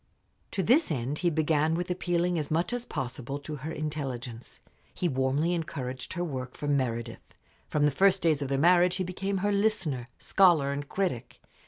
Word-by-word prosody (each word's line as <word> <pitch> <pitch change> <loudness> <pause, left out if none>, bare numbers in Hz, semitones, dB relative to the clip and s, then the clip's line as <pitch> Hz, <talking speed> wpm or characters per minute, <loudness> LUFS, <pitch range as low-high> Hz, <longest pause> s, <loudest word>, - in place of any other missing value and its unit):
To 190 - -1
this 275 - +4
end 140 0 -2
he 175 - +2
began 155 0 +2
with 180 +1 -2
appealing 175 -1 0
as 150 - -3
much 170 +8 0
as 245 0 -3
possible 130 +2 -4
to 150 +1 -7
her 150 +4 -5
intelligence. 135 -7 -5 0.4
He 180 - 0
warmly 135 +4 +1
encouraged 130 -6 -4
her 175 -1 -2
work 130 -6 -5
for 145 - -4
Meredith. 120 -5 -1 0.5
From 150 -1 +1
the 150 - +3
first 190 +5 +3
days 155 -4 +3
of 140 - -1
their 135 0 0
marriage 175 +4 +5
he 185 - -1
became 195 +2 -2
her 205 - +2
listener, 190 - 0
scholar, 170 -8 +4
and 140 0 -4
critic. 175 -11 -2
155 Hz, 180 wpm, -28 LUFS, 135-180 Hz, 0.5 s, marriage